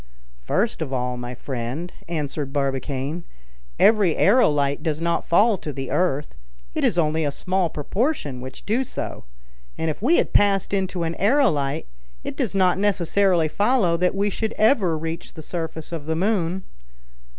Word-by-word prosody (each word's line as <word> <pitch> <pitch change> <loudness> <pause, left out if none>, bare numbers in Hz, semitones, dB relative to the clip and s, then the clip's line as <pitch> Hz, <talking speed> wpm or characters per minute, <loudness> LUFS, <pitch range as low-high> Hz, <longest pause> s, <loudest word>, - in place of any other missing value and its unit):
"First 195 - 0
of 145 -4 -3
all, 125 -1 -1
my 120 0 -6
friend," 130 +7 -5
answered 150 -4 -3
Barbicane, 140 +3 -2 0.6
"every 205 -7 +5
aerolite 150 - +3
does 155 -3 -1
not 170 0 -1
fall 205 +3 +4
to 150 - -5
the 135 -2 -5
earth; 150 -5 0 0.4
it - - -2
is - - +2
only 160 -1 +2
a 145 - +1
small 185 +4 0
proportion 150 - -2
which 130 0 -9
do 230 +6 +1
so; 255 - -6 0.5
and 160 - 0
if 155 - -9
we 310 +10 +4
had - - 0
passed 200 -1 +3
into 190 -3 -1
an 165 0 -1
aerolite, 165 - +2 0.4
it - - -5
does - - -1
not 185 -1 +3
necessarily 195 -3 +2
follow 205 0 +2
that 180 +2 +1
we 200 +1 +1
should 220 +2 -2
ever 210 - +3
reach 165 +1 -5
the 160 - -9
surface 160 -1 -5
of 160 -3 -5
the 160 - 0
moon." 185 -1 0
170 Hz, 160 wpm, -23 LUFS, 145-195 Hz, 0.6 s, every